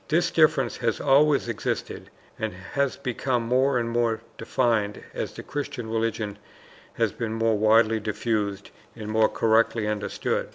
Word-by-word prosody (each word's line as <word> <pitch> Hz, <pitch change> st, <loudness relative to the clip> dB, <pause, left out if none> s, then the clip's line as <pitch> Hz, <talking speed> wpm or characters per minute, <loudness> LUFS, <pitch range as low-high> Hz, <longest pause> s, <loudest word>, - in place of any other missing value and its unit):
This 170 Hz, +3 st, +2 dB
difference 155 Hz, -4 st, +3 dB
has 115 Hz, -2 st, -1 dB
always 145 Hz, 0 st, +4 dB
existed 115 Hz, -3 st, -4 dB, 0.3 s
and 110 Hz, -2 st, -2 dB, 0.2 s
has 140 Hz, -2 st, 0 dB
become 125 Hz, -2 st, -1 dB
more 130 Hz, +3 st, +2 dB
and 120 Hz, -1 st, -1 dB
more 115 Hz, -1 st, 0 dB
defined 110 Hz, -5 st, 0 dB
as -, -, -3 dB
the -, -, -8 dB
Christian 125 Hz, -5 st, -5 dB
religion 110 Hz, -2 st, -2 dB, 0.5 s
has -, -, 0 dB
been 115 Hz, -1 st, -4 dB
more 115 Hz, 0 st, +2 dB
widely 110 Hz, +1 st, +4 dB
diffused 105 Hz, -2 st, -2 dB, 0.2 s
and 110 Hz, -2 st, -7 dB
more 110 Hz, 0 st, +4 dB
correctly 110 Hz, -1 st, +2 dB
understood. 105 Hz, -1 st, -2 dB
115 Hz, 140 wpm, -25 LUFS, 110-130 Hz, 0.5 s, always